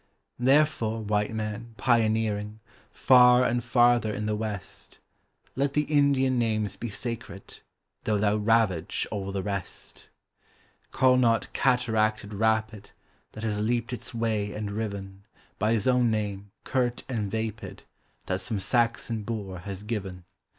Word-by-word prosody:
Therefore, 125 -4 +2
white 105 0 0
man, 110 +1 -5
pioneering 110 -3 +1 0.3
Far 125 -1 +6
and 120 -1 0
farther 120 -1 +3
in 105 0 -3
the 105 0 0
west, 105 -3 -6 0.6
Let 140 +1 0
the 150 - +2
Indian 140 -4 +2
names 110 -3 0
be 120 - -5
sacred, 115 -3 -7 0.5
Though 105 - +1
thou 105 +1 +2
ravage 105 -5 +1
all 100 -2 -3
the 95 -1 -3
rest. 100 -2 -6 0.8
Call 130 -1 +4
not 115 -3 +2
cataracted 110 -4 +1
rapid 110 -1 0 0.4
That 110 - -8
has 105 -2 -1
leaped 120 +3 -1
its 125 - -7
way 110 -3 -1
and 105 -1 -4
riven, 100 -2 -5 0.4
By 110 +2 +2
his 110 0 0
own 125 -2 +4
name, 100 -2 -3
curt 125 -2 -1
and 110 -6 -2
vapid, 110 0 -5 0.4
That 95 0 -2
some 100 +2 -3
Saxon 115 0 0
boor 100 -4 -5
has 100 +1 -7
given! 95 -5 -5
110 Hz, 135 wpm, -27 LUFS, 105-120 Hz, 0.8 s, Far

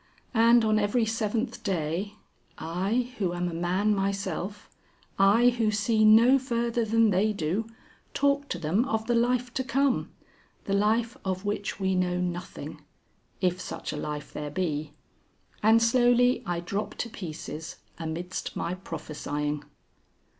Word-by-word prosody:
And 230 0 +5
on 215 0 +3
every 215 +3 +2
seventh 225 +2 -2
day, 185 +2 -2 0.4
I 195 +10 -1
who 180 -4 0
am 175 0 -1
a 175 - -4
man 180 +5 +1
myself, 195 0 -3 0.5
I 210 +5 +6
who 235 -3 +1
see 215 +1 +2
no 230 +5 +7
further 235 -2 -1
than 225 0 +3
they 200 +4 +2
do, 195 +5 -1 0.5
talk 280 0 +1
to - - -2
them 180 +9 +1
of 220 -4 -1
the 240 - +1
Life 245 +1 +1
to 260 - -1
Come 265 +2 +1 0.5
the 195 - -2
life 225 +4 +2
of 185 +1 -3
which 205 0 -2
we 190 -1 +1
know 180 -1 +1
nothing. 180 -1 -5 0.6
If 180 -1 +1
such - - -5
a - - -4
life 150 -1 -5
there 150 0 -4
be. 150 -2 -2 0.7
And 220 +2 +6
slowly 245 +1 +4
I 175 -1 -1
drop 200 +4 -3
to - - -3
pieces 160 -3 -7 0.2
amidst 170 +3 -4
my 170 - -2
prophesying." 150 -4 -4
205 Hz, 145 wpm, -27 LUFS, 175-230 Hz, 0.7 s, no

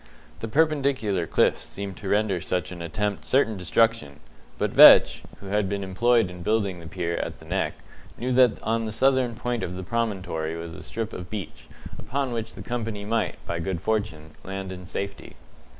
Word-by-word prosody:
The 115 - -4
perpendicular 135 - +1
cliffs - - +2
seemed 100 -1 -6
to 100 - -6
render 100 -4 +1
such 90 0 -2
an 90 -2 -7
attempt 100 +5 -2
certain 130 -5 +2
destruction; 90 -5 +1 0.4
but - - 0
Vetch, - - +8 0.2
who - - -12
had 105 -1 +1
been 100 0 -2
employed 115 +3 +2
in 90 0 -10
building 100 -2 0
the 85 - -10
pier 85 0 -3
at - - -4
the - - -15
Neck, - - -1 0.4
knew 125 +2 -2
that 125 -2 +4
on 115 0 0
the 110 - -3
southern 130 0 +2
point 120 0 -2
of 90 - -4
the 95 - -5
promontory 95 -7 -2
was 85 0 -7
a - - -9
strip 110 -1 -5
of 90 -1 -7
beach, 100 -7 -7 0.3
upon 135 0 -2
which 115 -1 -4
the - - -8
company 110 -4 -4
might, 110 0 0
by 85 - -3
good 90 0 -2
fortune, 95 -7 -2
land 95 0 -5
in 90 -1 -8
safety. 100 +2 -6
105 Hz, 185 wpm, -25 LUFS, 90-115 Hz, 0.4 s, Vetch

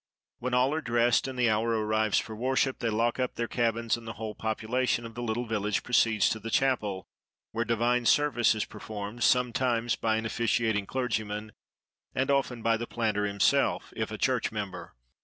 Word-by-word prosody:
When 125 0 -1
all 130 +3 +3
are 160 - -1
dressed, 120 -1 +2
and 130 -1 -6
the 120 -2 +3
hour 115 +1 +1
arrives 110 -1 +1
for 110 - -2
worship, 130 +3 0
they 115 - 0
lock 115 +3 0
up 125 - -1
their 115 - -2
cabins, 115 -1 0
and 115 -1 -10
the 115 - -4
whole 110 -1 -5
population 115 +3 -1
of 115 - -8
the 120 - -6
little 120 +1 -2
village 105 -2 -1
proceeds 115 -3 +3
to 110 - -2
the 115 - -6
chapel, 110 -8 0 0.5
where 115 +1 -1
divine 120 +1 +1
service 145 -6 +3
is 110 - -1
performed, 105 +2 -7
sometimes 120 -1 +2
by 110 -1 0
an 110 0 -2
officiating 110 -2 0
clergyman, 110 -4 -2 0.6
and 135 +2 +1
often 130 -4 0
by 115 0 +3
the 120 +1 -5
planter 110 -3 -1
himself, 100 -1 +1
if - - -2
a - - -5
church - - 0
member. - - -6
115 Hz, 185 wpm, -28 LUFS, 110-125 Hz, 0.6 s, all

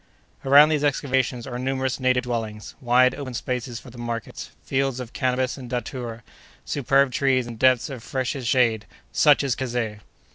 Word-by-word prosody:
Around 145 +3 +7
these 150 -2 0
excavations 130 -4 0
are 125 -2 -5
numerous 130 0 -1
native 130 -1 +2
dwellings; 110 -3 -4
wide, 125 +1 +4
open 130 -3 -6
spaces 125 -1 -3
for 125 - -13
the 120 - -12
markets; 120 -1 -5
fields 135 -1 -1
of 125 -2 -7
cannabis 130 0 -1
and 125 -2 -9
datura; 120 -2 -5 0.4
superb 140 -1 +2
trees 130 -2 +1
and 115 -2 -9
depths 130 -1 +4
of 135 -5 -7
freshest 130 0 -3
shade—such 125 +5 +2
is 135 -3 +1
Kazeh! 120 -5 -3
125 Hz, 155 wpm, -24 LUFS, 120-135 Hz, 0.4 s, Around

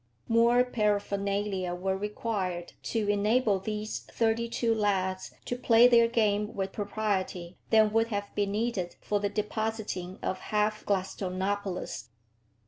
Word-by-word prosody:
More 235 +2 +5
paraphernalia 200 -4 -1
were 190 +2 -1
required 195 -3 -3 0.2
to 220 -3 0
enable 205 +1 +2
these 215 +2 -4
thirty 230 0 -1
two 230 -1 +1
lads 190 -3 0
to 245 - -2
play 240 -1 +6
their 235 -1 +6
game 210 -2 +1
with 195 -1 -2
propriety 195 -4 -2
than 215 -1 +5
would 225 0 +3
have 205 -2 -4
been 200 -1 0
needed 210 -5 -1
for 205 - -1
the 205 0 0
depositing 210 -3 -3
of 185 - -1
half 215 +1 0
Gladstonopolis. 190 - -2
205 Hz, 130 wpm, -29 LUFS, 190-225 Hz, 0.2 s, play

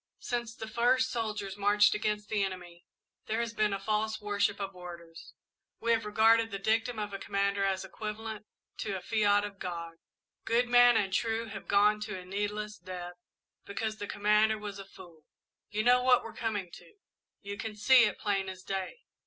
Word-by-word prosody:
Since 235 -2 -4
the 220 -4 -7
first 245 +3 +2
soldiers 210 -4 -3
marched 205 +1 +4
against 210 0 -2
the 205 -1 0
enemy, 180 -3 -6 0.4
there 220 +1 -1
has 235 -1 -2
been 215 -2 +1
a 195 - -1
false 215 +2 -1
worship 205 -1 0
of 195 -1 -5
orders 170 -2 -11 0.4
we 235 - 0
have 225 -2 +1
regarded 225 +2 +4
the 200 - -4
dictum 225 +4 0
of 210 -1 -4
a 195 - -4
commander 200 0 0
as 190 -1 0
equivalent 215 +1 -6 0.3
to 200 -3 -2
a - - -8
fiat 205 -2 +2
of 200 -1 -9
God. 170 -2 -5 0.5
"Good 235 +2 +2
men 245 -1 +6
and 195 -3 0
true 225 +2 0
have 195 -2 -8
gone 210 +1 +4
to 210 -2 -5
a 180 - -9
needless 210 +2 -3
death, 180 -1 -7 0.5
because 215 +2 -4
the 205 - -5
commander 210 +2 +3
was 205 -2 -7
a 195 - -8
fool. 175 -5 -14 0.5
You 215 +1 -1
know 250 +1 +5
what 250 -1 +4
we're 230 - -8
coming 205 -6 -3
to. 425 - -14 0.5
You 200 0 -5
can 220 0 -6
see 245 +3 +6
it, 210 - -2
plain 195 -2 -1
as 185 0 -9
day. 195 - -4
210 Hz, 185 wpm, -30 LUFS, 195-225 Hz, 0.5 s, men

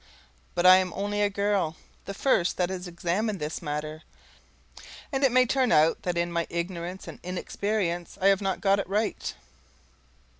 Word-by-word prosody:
But 175 - +1
I 185 0 +10
am 185 -1 0
only 205 +1 -1
a 205 - +3
girl, 200 -5 0 0.3
the 200 - -6
first 190 -7 +1
that 180 0 0
has 185 -1 -5
examined 180 +5 -1
this 150 +2 -4
matter, 155 0 -4 1.1
and 270 -1 -1
it 270 - +5
may 255 +1 +5
turn 255 0 +1
out 155 +2 +4
that 175 -1 -2
in 170 0 0
my 170 -1 -1
ignorance 170 +1 -4
and - - -9
inexperience 180 0 -3
I 195 +1 +5
have 195 0 +3
not 195 -1 -1
got 200 0 +3
it 195 - -4
right. 210 +2 -1
185 Hz, 175 wpm, -27 LUFS, 170-205 Hz, 1.1 s, I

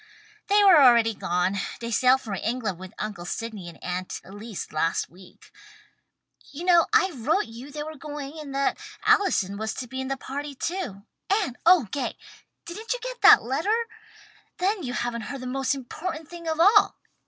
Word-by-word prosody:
"They 410 +1 +4
are 365 -7 +8
already 235 -3 +6
gone. 180 0 -1 0.2
They 235 0 -5
sailed 255 +4 +4
for 215 -5 -6
England 215 -3 -2
with 185 0 -9
Uncle 210 -5 -5
Sydney 205 -1 -5
and 165 - -13
Aunt 180 0 -4
Elise 205 +2 -8
last 165 +2 -1
week. 180 +1 -17 1.0
You 320 +5 -7
know 345 -2 +5
I 405 -3 +4
wrote 310 - 0
you 235 +5 -10
they 295 +1 -5
were 315 +1 -7
going 295 0 -7
and 280 -3 -7
that 275 0 0 0.3
Allison 390 - +3
was 220 0 -3
to 255 - -5
be 260 +2 -5
in 265 - -4
the 270 0 -2
party 280 +2 -6
too. 320 - -4 0.3
And 390 - +1
oh 345 -9 +6
Gay! 285 - -3 0.5
Didn't 435 +7 -4
you - - -5
get - - -6
that 425 +1 +8
letter? 395 - 0 0.7
Then 385 +2 0
you 250 -5 -4
haven't 240 -1 -2
heard 275 -2 -6
the - - -7
most 270 +2 -1
important 310 +5 -6
thing 340 0 -9
of 320 0 -1
all! 405 +4 +5
270 Hz, 180 wpm, -25 LUFS, 225-345 Hz, 1.0 s, are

